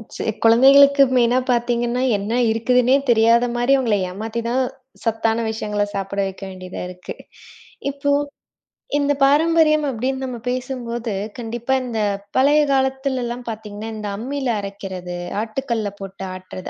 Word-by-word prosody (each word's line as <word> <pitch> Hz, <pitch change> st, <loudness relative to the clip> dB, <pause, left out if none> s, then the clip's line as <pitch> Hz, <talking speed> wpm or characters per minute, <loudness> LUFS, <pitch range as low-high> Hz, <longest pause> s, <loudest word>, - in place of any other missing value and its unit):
C -, -, -4 dB, 0.2 s
குழந்தைகளுக்கு 275 Hz, +4 st, +7 dB
மெயினா 240 Hz, +1 st, +3 dB
பாத்தீங்கன்னா, 240 Hz, 0 st, 0 dB, 0.2 s
என்ன 200 Hz, +3 st, -4 dB, 0.2 s
இருக்குதுன்னே 250 Hz, +3 st, +3 dB
தெரியாத 230 Hz, +1 st, +5 dB
மாரி 245 Hz, +3 st, +2 dB
அவங்களை 230 Hz, -6 st, +1 dB
ஏமாத்திதான், 230 Hz, +6 st, -2 dB, 0.4 s
சத்தான 225 Hz, 0 st, 0 dB
விஷயங்கள 210 Hz, -2 st, -2 dB
சாப்பிட 195 Hz, 0 st, -3 dB
வைக்க 195 Hz, +1 st, -8 dB
வேண்டியதா 185 Hz, -1 st, -8 dB
இருக்கு. 180 Hz, 0 st, -8 dB, 0.8 s
இப்போ, 285 Hz, +1 st, -1 dB, 0.9 s
இந்தப் 285 Hz, -1 st, 0 dB
பாரம்பரியம் 305 Hz, +1 st, +4 dB
அப்டின்னு 265 Hz, +2 st, -2 dB
நம்ம 250 Hz, -2 st, -5 dB
பேசும்போது, 245 Hz, -3 st, -3 dB, 0.3 s
கண்டிப்பா 240 Hz, +3 st, -2 dB
இந்தப் 210 Hz, -4 st, -2 dB
பழைய 290 Hz, +3 st, +5 dB
காலத்து 265 Hz, 0 st, +1 dB
எல்லாம் 240 Hz, +1 st, -5 dB
பாத்தீங்கன்னா, 215 Hz, 0 st, -7 dB
இந்த 210 Hz, -1 st, -5 dB
அம்மில 265 Hz, +3 st, -3 dB
அரைக்கிறது, 190 Hz, -3 st, -6 dB, 0.2 s
ஆட்டுக்கல்ல 225 Hz, -2 st, -3 dB
போட்டு 195 Hz, 0 st, -7 dB
ஆட்டுறது 185 Hz, 0 st, -8 dB
235 Hz, 120 wpm, -21 LUFS, 210-265 Hz, 0.9 s, குழந்தைகளுக்கு